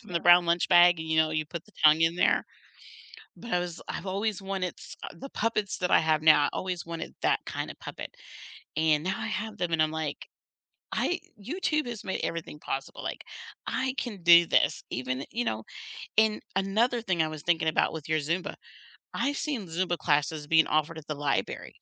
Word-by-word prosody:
from 180 - -13
the 170 - 0
brown 175 0 +6
lunch 170 0 +2
bag, 175 -1 +7
and, 160 - -5
you 160 0 0
know, 160 0 +4
you 155 -1 -1
put 165 +1 -7
the 215 - -21
tongue 155 +1 +7
in 165 +1 +3
there, - - +3 0.9
but 235 - -9
I 180 - +3
was 175 -1 -5
I've - - -5
always 200 +1 -1
wanted 190 -2 -3
s - - -10
uh, - - -5
the 275 +1 -9
puppets 210 -2 -1
that 180 - -1
I - - +7
have 155 -1 +2
now, 155 -2 +6
I - - 0
always 180 -2 -3
wanted 165 -1 -6
that - - +2
kinda - - -4
puppet, - - -8 0.6
and 155 -1 +3
now 190 +1 -1
I - - -3
have 210 +3 -4
them, 175 -1 -2
and 160 - +3
I'm 155 0 +2
like, 160 -2 -4 0.7
"I 355 - 0 0.2
YouTube 305 - -1
has 235 -4 -6
made 190 - -3
everything 165 -2 -4
possible, 135 0 -5
like, - - -5 0.4
I 260 0 -1
can 210 -8 -4
do 170 0 +9
this, - - +2
even" 130 +2 -3
you 240 +1 -2
know, 110 - -2 0.5
and 220 -1 +4 0.2
another 220 +5 +1
thing 180 -6 -1
I 160 - 0
was 155 -1 -7
thinking 165 -2 +1
about 155 - +2
with 160 -2 -7
your 155 -1 +2
Zumba: 170 +6 -2 0.6
I've 280 0 -1
seen 275 -10 -3
Zumba 175 +1 -1
classes 150 0 0
being 160 +1 +5
offered 155 +1 0
at 150 - -16
the 150 - -3
library. 145 -1 -2
170 Hz, 205 wpm, -28 LUFS, 155-195 Hz, 0.9 s, do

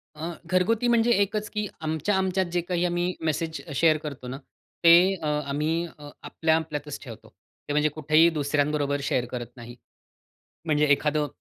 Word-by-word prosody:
अ, 160 +3 -5
घरगुती 195 +7 +1
म्हणजे 235 0 +3
एकच 210 +1 -1
की 210 -1 -3
आमच्या-आमच्यात 185 +4 0
जे 175 0 0
काही 175 0 -1
आम्ही 175 +1 0
मेसेज 160 +1 -2
शेअर 155 +2 +4
करतो 145 -4 -8
ना, 130 +2 -5 0.5
ते 165 0 +9 0.2
अ, 165 -4 -7 0.2
आम्ही 160 +4 0
अ, 145 -1 -11
आपल्या, 160 -1 +1
आपल्यातच 150 -2 -4
ठेवतो. 115 -6 -11 0.4
ते 145 - -2
म्हणजे 150 +1 +2
कुठेही 155 +2 +3
दुसऱ्यांबरोबर 145 -1 0
शेअर 125 -3 0
करत 120 -2 -5
नाही. 120 0 -10 0.9
म्हणजे 150 -1 +2
एखादं 150 +1 +2
155 Hz, 155 wpm, -26 LUFS, 145-175 Hz, 0.9 s, ते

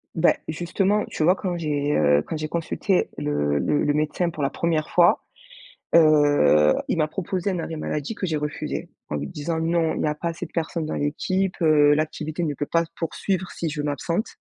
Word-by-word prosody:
Bah 165 +1 +4
justement 185 +6 0
tu 155 - -3
vois 180 +4 +5
quand 180 -2 -3
j'ai, 150 -2 -1
heu, 75 -1 +4
quand - - -3
j'ai 155 0 -4
consulté 170 +3 0
le 75 0 0
le 145 - +1
médecin 155 +3 0
pour 150 -3 -5
la 140 - +2
première 165 -2 -1
fois, 175 -1 +4 0.7
heu, 145 - +5
il - - 0
m'a 155 -1 +2
proposé 185 +3 -3
un 185 - -1
arrêt 165 -1 -4
maladie 150 +5 -3
que 190 - -3
j'ai 155 -2 0
refusé 150 0 -4 0.2
en 75 - -2
lui 70 0 -3
disant: 160 - -3
«Non 165 0 +1
il - - -2
y - - +1
a 150 - +1
pas 170 +3 -4
assez 165 - -5
de - - -14
personnes 165 -1 -2
dans - - -4
l'équipe, 185 +6 -1
heu, 150 -2 +5
l'activité 155 +2 -2
ne 150 -3 -1
peut 145 +1 -4
pas 165 0 +1
se 165 - -24
poursuivre 185 +3 -2
si 165 - -4
je 150 0 -3
m'absente». 165 - -2
155 Hz, 210 wpm, -24 LUFS, 145-170 Hz, 0.7 s, vois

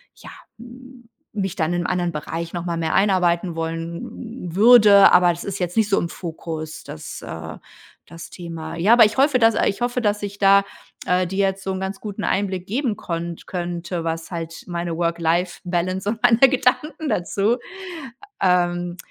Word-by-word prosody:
ja, - - -13 0.3
m 245 0 -14 0.3
mich 195 -2 -2
dann 165 -2 0
in 175 0 -1
anderen 175 -2 -1
Bereich 165 +2 -5
noch 175 -1 -3
mal 170 -1 -3
mehr 160 -1 -1
einarbeiten 180 -3 +2
wollen 170 +5 -6
würde. 210 -2 +7
Aber 180 -1 +6
das 170 - -6
ist 200 -1 -4
jetzt 180 -1 -3
nicht 220 -2 +2
so 200 - +3
im 170 - -2
Fokus, 160 -2 -7
das 80 - -9
äh, 80 -1 -7 0.5
das 165 0 -11
Thema. 165 -3 -7
Ja, 190 +7 +4
aber 240 - +8
ich 215 - -2
hoffe 275 -1 +4
dass 225 -1 +4
äh, - - +2
ich 200 - -2
hoffe, 245 +1 0
dass 210 -2 0
ich 200 0 -5
da, 200 0 +5 0.4
äh, 180 0 +2
dir 190 +3 -4
jetzt 190 0 -4
so 190 - -2
'n 190 - -4
ganz 190 +1 -4
guten 210 -1 -6
Einblick 190 -2 -1
geben 235 0 -1
konnt 170 0 -5
könnte, 175 -1 -4
was 165 0 -4
halt 165 -2 -6
meine 170 -1 -3
Work-Life-Balance 175 +2 -1
und 225 +2 -3
meine 240 -2 +5
Gedanken 270 +3 +2
dazu, 200 +6 0 0.8
ähm, 175 -1 +1
180 Hz, 175 wpm, -22 LUFS, 170-210 Hz, 0.8 s, aber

